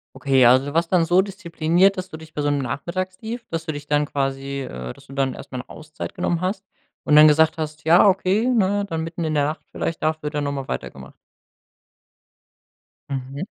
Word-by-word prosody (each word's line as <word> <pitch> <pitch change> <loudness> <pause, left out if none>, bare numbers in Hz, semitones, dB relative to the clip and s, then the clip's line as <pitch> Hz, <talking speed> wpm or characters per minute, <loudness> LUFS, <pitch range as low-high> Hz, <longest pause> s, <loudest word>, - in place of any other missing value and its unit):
Okay, 135 -2 +3
also 130 +2 +6
du 145 - -5
warst 165 +1 +1
dann 180 -3 +4
so 175 +3 +4
diszipliniert, 190 -1 +1
dass 185 0 -4
du 160 - -8
dich 160 0 -13
bei 150 - -4
so 145 - +1
'nem 145 -1 0
Nachmittagstief 185 - -4
dass 165 0 -4
du 160 - -2
dich 145 0 -8
dann 150 0 +1
quasi 135 0 -3
äh, 65 - -6
dass - - -18
du - - -14
dann 135 -2 0
erst - - -11
mal 130 - -4
'ne 125 - -8
Auszeit 155 +1 -8
genommen 175 -2 -1
hast 190 +2 -2 0.4
und 150 - +3
dann 150 +1 +9
gesagt 160 +1 +3
hast: 155 -1 -5
„Ja 170 +5 +6
okay, 195 +4 +2
ne, 205 -5 +2
dann 165 -3 -2
mitten 165 +1 -5
in 155 -1 -1
der 145 -1 +2
Nacht 155 +2 -3
vielleicht, 165 - -4
dafür 155 -1 -1
dann 150 -1 -2
noch 140 - -2
mal 135 -2 -4
weitergemacht.“ 65 - -6 2.0
Mhm. 135 +1 -5
155 Hz, 215 wpm, -22 LUFS, 140-180 Hz, 2.0 s, dann